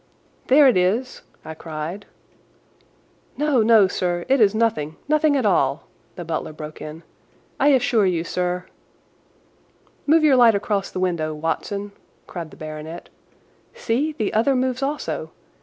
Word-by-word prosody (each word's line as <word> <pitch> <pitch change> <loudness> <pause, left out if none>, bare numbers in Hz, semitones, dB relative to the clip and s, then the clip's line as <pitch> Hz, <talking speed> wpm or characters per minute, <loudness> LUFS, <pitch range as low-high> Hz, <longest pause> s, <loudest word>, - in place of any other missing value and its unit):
"There 280 +2 +6
it 250 - +4
is!" 215 +8 0 0.2
I 160 - -6
cried. 160 +5 -7 1.3
"No, 295 -4 +2
no, 220 -3 +5
sir, 175 -1 -2
it 270 -2 +3
is 210 0 +4
nothing—nothing 230 - +1
at 255 - 0
all!" 140 -8 +1 0.3
the 175 - -7
butler 160 -1 -4
broke 155 0 -9
in; 155 +2 -8 0.6
"I 280 - +3
assure 245 -7 +3
you, 170 -3 0
sir—" 180 +1 -2 1.4
"Move 315 +2 +4
your 295 -3 +5
light 235 -3 +6
across 200 -1 -1
the - - -5
window, 165 -4 -1
Watson!" 200 +6 -3 0.3
cried 170 -3 -7
the - - -16
baronet. 155 +2 -8 0.7
"See, 280 +7 -1
the 220 -9 -2
other 235 +6 +2
moves 255 0 -1
also! 285 +2 -3
200 Hz, 140 wpm, -22 LUFS, 165-255 Hz, 1.4 s, There